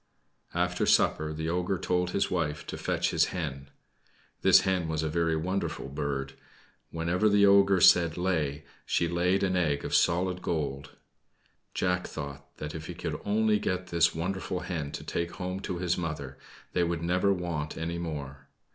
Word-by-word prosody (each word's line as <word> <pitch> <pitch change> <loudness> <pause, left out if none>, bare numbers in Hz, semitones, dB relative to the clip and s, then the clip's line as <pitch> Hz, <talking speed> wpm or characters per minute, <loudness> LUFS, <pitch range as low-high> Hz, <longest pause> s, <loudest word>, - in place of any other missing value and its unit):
After - - 0
supper, 75 0 +3
the 80 +1 -4
ogre 90 +3 0
told 90 +1 0
his 100 - 0
wife 80 -5 -1
to - - -5
fetch - - 0
his - - +3
hen. 70 -6 -5 0.7
This - - +7
hen 90 -3 0
was 80 0 -1
a 80 - 0
very 80 0 +1
wonderful 90 -2 -2
bird. 70 -1 -3 0.6
Whenever 85 +6 +1
the 100 0 +5
ogre 100 -1 +5
said 85 -2 +6
"Lay" 80 -5 -1 0.2
she 85 - +1
laid 90 +3 +1
an 95 -1 +1
egg 75 -5 0
of - - -4
solid 90 +1 +2
gold. 70 -4 -3 0.8
Jack 90 0 0
thought 70 0 -7
that 75 0 -5
if 80 -1 -7
he 90 - -6
could 85 -3 -4
only 105 +1 +2
get 95 -3 -2
this 85 -1 +3
wonderful 90 +2 -3
hen 75 -6 -4
to - - -5
take 85 0 -3
home 90 0 -4
to 95 -2 -4
his 90 0 0
mother, 75 -5 -4 0.4
they 90 - +2
would 85 -1 -1
never 90 +3 +2
want 85 -5 -3
any 85 +1 -3
more. 70 -4 -6
85 Hz, 170 wpm, -29 LUFS, 75-90 Hz, 0.8 s, This